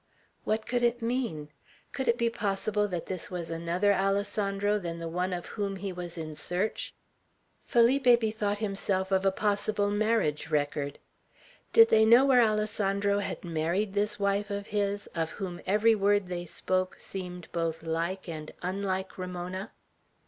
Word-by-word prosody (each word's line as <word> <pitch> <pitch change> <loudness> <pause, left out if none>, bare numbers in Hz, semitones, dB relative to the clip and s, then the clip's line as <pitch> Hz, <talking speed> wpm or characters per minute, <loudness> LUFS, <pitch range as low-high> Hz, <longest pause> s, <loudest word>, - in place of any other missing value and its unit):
What 220 0 0
could 245 0 0
it 240 0 +1
mean? 230 - -2 0.4
Could 265 - -3
it 235 - +3
be 235 -1 +2
possible 210 -1 0
that 175 -4 -4
this 185 -3 -5
was 175 -2 -5
another 170 +5 +1
Alessandro 200 +1 0
than 170 -3 -5
the 165 0 -5
one 180 +3 -1
of 175 -1 -3
whom 200 -2 -3
he 195 0 -4
was 175 -1 -6
in 155 -1 -5
search? 180 +7 -3 0.7
Felipe 245 +1 +4
bethought 215 -2 -1
himself 195 -2 -1
of 190 0 +3
a - - +4
possible 205 0 0
marriage 205 -9 +1
record. 145 -1 -1 0.7
Did 455 0 +8
they 220 - +6
know 235 +4 +7
where 260 -3 +6
Alessandro 205 -2 +1
had 200 - -4
married 170 +5 -1
this 205 +1 0
wife 200 +1 +1
of 200 0 -3
his, 205 -1 -1
of 165 -2 -1
whom 180 -3 -5
every 215 +3 +4
word 205 -2 +2
they 175 -1 -4
spoke 185 +3 -1
seemed 180 -2 -6
both 165 -1 -2
like 170 +4 -2
and 155 -2 -6
unlike 190 0 -2
Ramona? 185 +2 -5
195 Hz, 155 wpm, -29 LUFS, 175-210 Hz, 0.7 s, Did